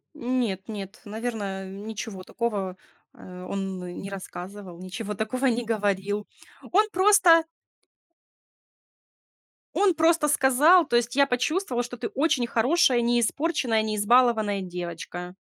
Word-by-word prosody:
Нет, 240 -8 -2
нет, 200 -2 -8
наверное, 205 -3 -4
ничего 205 0 -7
такого, 200 -5 -3 0.4
э, 180 0 -11
он 195 -1 -4 0.2
не 195 - -7
рассказывал, 190 -1 -8
ничего 195 +4 -6
такого 220 +6 -2
не 245 -2 +1
говорил. 205 -2 -1 0.4
Он 425 +4 +3
просто 370 -4 +5 2.3
он 395 -2 +3
просто 325 -1 +3
сказал, 295 +5 +5
то 240 - -1
есть, 240 +1 +1
я 280 0 +4
почувствовал, 250 +1 -1
что 245 0 -8
ты 235 - -3
очень 280 -4 +1
хорошая, 250 +2 +3
неиспорченная, 240 +1 +1
неизбалованная 215 -1 +2
девочка. 180 0 -7
225 Hz, 110 wpm, -25 LUFS, 195-265 Hz, 2.3 s, просто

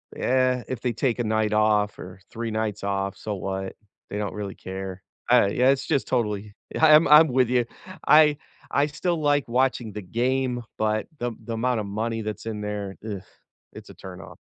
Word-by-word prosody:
yeah, 130 -1 +1
if 130 -3 -3
they 125 -2 -1
take 125 +1 0
a - - +1
night 110 -1 0
off 105 -1 +2
or 90 +1 -10
3 115 0 -4
nights 110 -1 -2
off, 100 0 -2
so 105 -2 -4
what? 95 0 -4 0.3
They 105 - -4
don't 105 -1 -3
really 100 -2 -5
care. 95 0 -7 0.3
I 100 - +6
Yeah, 125 +5 +3
it's 135 - -1
just 145 -4 0
totally 105 -4 -1 0.2
ye - - -3
I'm 155 0 +7
I'm 155 +2 +9
with 125 -2 +2
you, 125 -2 +2 0.4
I 150 -1 +6 0.3
I 140 +1 +3
still 170 +3 -2
like 145 -2 +2
watching 125 -3 +1
the 105 - -6
game, 125 +4 -1
but 110 0 0
the 120 -1 -2
the 115 - -5
amount 120 -1 0
of - - -5
money 110 +3 -2
that's 110 0 -5
in 110 -2 -4
there, 105 -2 -4
ugh, 100 -4 -4 0.5
it's - - -11
a - - -10
turnoff. 95 -1 -10
110 Hz, 195 wpm, -25 LUFS, 105-130 Hz, 0.5 s, I'm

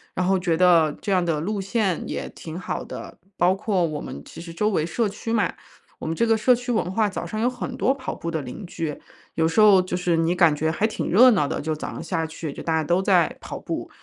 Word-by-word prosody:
然 185 - 0
后 190 0 +2
觉 170 -3 0
得 170 -3 +5
这 200 - -3
样 185 -2 +3
的 165 -3 0
路 200 +4 -2
线 195 -3 0
也 - - -4
挺 165 +2 -8
好 - - -4
的。 - - -9 0.2
包 180 +2 +4
括 195 -3 0
我 155 -2 -4
们 - - -7
其 - - -10
实 170 0 -8
周 210 +6 0
围 170 -7 +1
社 215 +7 0
区 225 +3 -5
嘛， 225 - +1 0.5
我 - - -5
们 165 - -1
这 230 - +2
个 225 -1 +3
社 245 +3 +4
区 245 +1 -4
文 220 -5 0
化 215 +2 +2
早 200 - -4
上 215 - -5
有 235 - +2
很 250 -1 -4
多 265 - +2
跑 260 -2 -5
步 170 - -5
的 160 - -2
邻 135 - -8
居。 160 -3 -4 0.4
有 160 0 +2
时 190 +7 +2
候 200 -3 +7
就 185 - -3
是 180 -2 +1
你 165 +2 +1
感 170 -4 +5
觉 160 +2 0
还 165 +6 0
挺 220 - -2
热 245 +7 +7
闹 165 -9 +2
的， - - -3
就 155 +1 -2
早 155 - -5
上 - - -7
下 165 -3 -1
去， 160 -1 -6
就 - - -8
大 165 - 0
家 160 - +1
都 175 +4 +1
在 185 -4 +2
跑 - - -7
步， - - -5
180 Hz, 285 characters per minute, -24 LUFS, 165-215 Hz, 0.5 s, 候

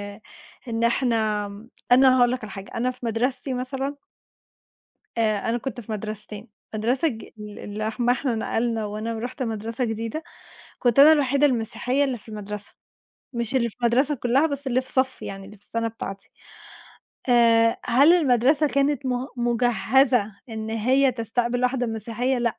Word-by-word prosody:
آآ، 215 - -18 0.5
إن 230 0 -2
إحنا 225 -4 +1 0.5
أنا 260 0 +7
هاقول 245 -1 +4
لك 255 -3 -3
على 210 - -7
حاجة 195 0 -9
أنا 250 +2 +1
في 250 -1 -10
مدرستي 250 +4 -1
مثلًا 270 +3 -3 1.2
آآ، 215 -1 +1
أنا 235 - +1
كنت 245 0 -5
في 220 - -9
مدرستين، 215 +1 -6 0.3
مدرسة 245 +8 +1
ج 225 -6 -4 0.2
ال 210 -1 -9
اللي 215 +1 -4
احم 240 +2 -1
إحنا 250 -1 +1
نقلنا 225 0 -1
وأنا 215 +2 -4
ورُحت 250 +4 -4
مدرسة 225 +2 -3
جديدة، 230 +8 -4 0.6
كنت 245 +1 +2
أنا 300 +3 +10
الوحيدة 280 -1 +3
المسيحية 250 +2 0
اللي 265 -3 -1
في 220 - -17
المدرسة، 210 -1 -7 0.6
مش 235 +1 -3
اللي 235 -2 +2
في - - -25
المدرسة 260 +5 +2
كلها 260 +4 +2
بس 280 -2 -4
اللي 255 0 +2
في 260 - -9
صفي 260 0 0
يعني، 195 0 -7
اللي 210 +2 -12
في 200 - -22
السنة 230 +1 -2
بتاعتي. 195 -3 -8 1.0
آآ، 230 -2 +4
هل 275 +7 +5
المدرسة 285 -1 +3
كانت 280 0 0
م 250 +1 -1
مُجَهزة 240 -1 +2 0.2
إن 220 -1 -5
هي 255 +4 +3
تستقبل 240 +1 -1
واحدة 250 -1 +1
مسيحية؟ 230 +3 -1
لأ. 235 -1 -1
240 Hz, 160 wpm, -24 LUFS, 220-260 Hz, 1.2 s, أنا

